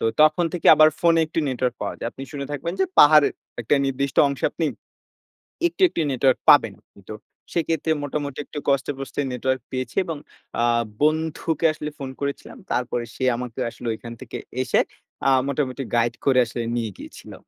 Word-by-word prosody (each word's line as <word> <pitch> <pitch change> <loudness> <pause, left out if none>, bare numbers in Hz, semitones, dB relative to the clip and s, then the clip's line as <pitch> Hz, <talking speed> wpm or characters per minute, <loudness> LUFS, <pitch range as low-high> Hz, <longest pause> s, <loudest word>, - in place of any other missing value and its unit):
তো - - -2 0.2
তখন 155 +3 +4
থেকে 175 - -3
আবার 155 0 +7
ফোনে 165 -1 +4
একটু 160 - -5
নেটওয়ার্ক 125 -1 -1
পাওয়া - - -3
যায়। - - -3
আপনি 135 - -9
শুনে 140 -2 -5
থাকবেন 145 +4 -3
যে, - - +5
পাহাড়ের 150 -1 +7 0.3
একটা 130 - +2
নির্দিষ্ট 135 0 -2
অংশে 140 -1 -4
আপনি 165 - -2 1.0
একটু, 345 - -9
একটু 250 - -5
নেটওয়ার্ক 130 0 +2
পাবেন। - - +6 0.4
তো - - -4 0.4
সেক্ষেত্রে 165 -2 0
মোটামুটি 145 -1 -4
একটু 145 - -6
কষ্টে-পষ্টে 135 0 -1
নেটওয়ার্ক 130 0 -1
পেয়েছি 130 0 -4
এবং 165 -3 -4 0.4
আ - - +2 0.4
বন্ধুকে 160 +1 0
আসলে 150 0 -5
ফোন 135 -2 -6
করেছিলাম। 140 - -4
তারপরে 125 -1 -1
সে 130 - -5
আমাকে 125 -2 -6
আসলে 120 +1 -9
ওইখান 115 +1 -8
থেকে 130 - -7 0.3
এসে, - - +2 0.5
আ - - +6 0.2
মোটামুটি 135 -1 -2
গাইড 120 0 +2
করে 130 -2 +4
আসলে 115 +1 -4
নিয়ে 115 -3 -2
গিয়েছিল। - - -11
140 Hz, 170 wpm, -23 LUFS, 125-155 Hz, 1.0 s, আবার